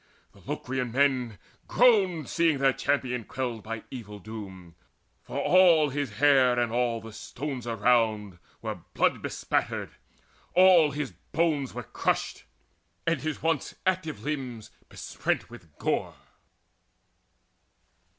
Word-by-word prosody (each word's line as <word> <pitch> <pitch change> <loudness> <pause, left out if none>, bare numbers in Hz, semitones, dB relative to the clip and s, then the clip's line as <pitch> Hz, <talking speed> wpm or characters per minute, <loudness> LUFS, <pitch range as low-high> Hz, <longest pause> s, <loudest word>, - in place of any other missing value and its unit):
The - - -19
Locrian 130 -2 -3
men 130 -4 +1 0.3
Groaned, 195 -10 +3
seeing 165 -4 +2
their 135 0 +3
champion 125 -4 -1
quelled 120 -1 -4
by 115 +2 -6
evil 105 -5 -8
doom; 95 -4 -9 0.5
For - - -7
all 175 -5 +5
his 140 -5 -3
hair 130 0 +4
and 120 -2 0
all 120 -1 0
the 115 -1 -10
stones 125 +2 -6
around 110 -4 +1 0.2
Were 110 -4 -4 0.2
brain - - +2
bespattered: - - -2 0.6
all 180 -4 +7
his 145 -1 -4
bones 155 -5 -1
were - - -4
crushed, - - -2 0.6
And 165 -5 +1
his 155 -1 -4
once 160 -3 0
active 185 -4 -1
limbs 130 -7 -4 0.2
besprent - - -3
with 80 -3 -14
gore. - - -1
130 Hz, 120 wpm, -27 LUFS, 115-150 Hz, 0.6 s, all